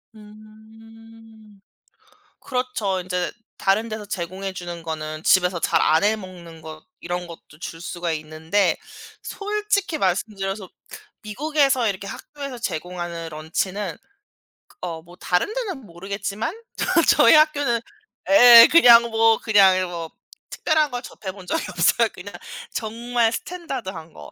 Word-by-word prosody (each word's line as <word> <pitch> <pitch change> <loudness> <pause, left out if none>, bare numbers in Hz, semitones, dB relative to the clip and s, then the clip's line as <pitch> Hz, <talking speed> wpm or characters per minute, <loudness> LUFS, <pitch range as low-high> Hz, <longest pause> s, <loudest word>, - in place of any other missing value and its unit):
음. 220 0 -17 0.8
그렇죠. 250 -7 -2
인제 180 0 -3 0.3
다른 210 +4 +1
데서 215 -1 -6
제공해 190 0 -5
주는 175 -2 -7
거는 155 -1 -5
집에서 180 -2 +3
잘 - - +1
안 160 +5 +3
해 215 +1 +3
먹는 175 -5 -11
거 155 0 -11
이런 175 0 -4
것도 165 -2 -14
줄 165 -1 -8
수가 175 -1 -4
있는데 160 +5 0 0.5
솔직히 410 -4 -2
말씀드려서 195 -1 -2 0.5
미국에서 270 +1 +1
이렇게 200 -1 -3
학교에서 280 +4 -8
제공하는 175 -5 -5
런치는 170 +5 -3 0.7
그 - - -25
어 165 -2 -5
뭐 175 +2 -16
다른 180 - -1
데는 385 - -5
모르겠지만 200 - -5 0.2
저 - - -1 0.3
저희 230 - +7
학교는 290 -6 +3 0.5
예 245 -5 +10
그냥 240 -8 +8
뭐 225 0 +4
그냥 200 -4 +5
이 185 - 0
뭐 170 -2 -5 0.4
특별한 310 -2 +1
걸 245 0 -4
접해 190 -5 -8
본 195 -2 -13
적이 325 - -2
없어요. - - +2
그냥 - - -11 0.4
정말 230 +1 -1
스탠더드한 245 - -6
거. - - -12
205 Hz, 270 characters per minute, -22 LUFS, 175-235 Hz, 0.8 s, 예